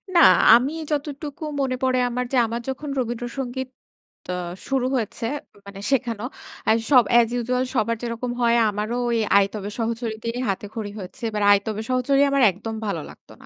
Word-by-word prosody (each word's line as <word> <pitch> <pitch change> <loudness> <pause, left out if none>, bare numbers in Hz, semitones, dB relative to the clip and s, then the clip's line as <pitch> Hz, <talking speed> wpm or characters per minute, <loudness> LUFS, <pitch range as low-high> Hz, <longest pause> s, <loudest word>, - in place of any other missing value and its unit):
না, - - +7 0.3
আমি 250 +4 +4 0.2
যতটুকু 290 +1 -4 0.2
মনে 260 -2 0
পড়ে 255 -1 +2
আমার 250 +1 -2
যে - - +3
আমার 230 +1 -4
যখন 285 +3 -4
রবীন্দ্রসঙ্গীত 245 +2 -4 0.6
ত - - -19 0.4
শুরু 265 -2 0
হয়েছে, 230 -1 -3 0.4
মানে 200 0 -10
শেখানো; 235 -5 0 0.5
এ - - +7 0.2
সব 255 -3 +8
অ্যাজ 235 -1 +6
ইউজুয়াল 250 +1 0
সবার 230 0 +1
যেরকম 240 +1 -3
হয় 235 0 +4
আমারও 210 +3 -2
ওই 235 - +1 0.2
"আইতবে 200 0 0
সহচরীতে 230 -1 -3 0.2
হাতেখড়ি" 205 +2 -4
হয়েছে। 185 +4 -10
বাট 210 -1 -1
"আইতবে 205 +1 +1
সহচরী" 255 +2 +2
আমার 275 0 +2
একদম 220 +5 -6
ভালো 195 -6 -2
লাগত - - -17
না। - - -15
235 Hz, 160 wpm, -23 LUFS, 220-255 Hz, 0.6 s, সব